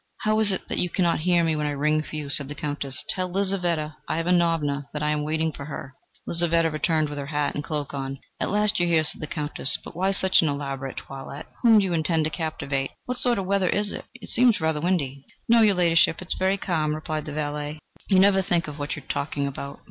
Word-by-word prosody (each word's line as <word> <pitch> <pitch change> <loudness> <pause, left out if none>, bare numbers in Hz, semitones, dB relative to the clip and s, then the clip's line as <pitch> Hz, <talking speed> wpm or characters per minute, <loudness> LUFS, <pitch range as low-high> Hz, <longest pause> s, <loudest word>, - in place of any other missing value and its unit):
"How 215 0 +2
is 215 -2 +4
it 190 - -2
that - - -2
you 180 - +1
cannot 170 -3 +1
hear 175 +1 +3
me 160 -1 +1
when 150 -1 -1
I 145 - -1
ring 150 +2 +1
for 155 - -8
you?" 150 -2 -4
said 140 -1 0
the 150 - -6
Countess. 145 -3 -4
"Tell 185 -1 0
Lizaveta 175 -5 -1
Ivanovna 165 -4 +1
that 150 0 -3
I 150 - +1
am 150 0 0
waiting 160 +1 0
for 140 - -8
her." 135 -2 -7 0.3
Lizaveta 170 -1 +2
returned 155 0 +1
with 145 0 -6
her 140 - -5
hat 145 -1 0
and 145 - -3
cloak 150 -2 -3
on. 135 -1 -4 0.2
"At - - -1
last 210 0 +2
you 175 - +2
are - - 0
here!" 160 -1 +4
said 150 - -4
the 155 - -4
Countess. 150 -3 0
"But - - -10
why 190 +3 +1
such 190 -1 +3
an 160 - +1
elaborate 135 -2 -4
toilette? 135 +1 -8 0.2
Whom 230 -3 +7
do 205 - +4
you 180 - -1
intend 160 0 +1
to 155 - -1
captivate? 140 -5 -2 0.2
What 250 0 -3
sort 245 -2 +3
of 195 - -2
weather 195 -1 +2
is 205 0 +1
it? - - -7
It 235 -4 -10
seems 240 -2 +4
rather 160 -1 0
windy." 140 -6 -1 0.2
"No, 230 0 +6
your 210 -3 +5
Ladyship, 165 -2 +4
it 185 - -10
is - - +1
very 190 +1 +2
calm," 155 -5 0
replied 155 -1 -4
the 150 - -6
valet. 150 0 -3 0.3
"You 195 - +4
never 195 0 +5
think 175 -4 +1
of 150 0 -7
what 145 0 -2
you 145 - -9
are - - -27
talking 140 0 -2
about. 140 0 -6
160 Hz, 245 wpm, -25 LUFS, 145-185 Hz, 0.3 s, Whom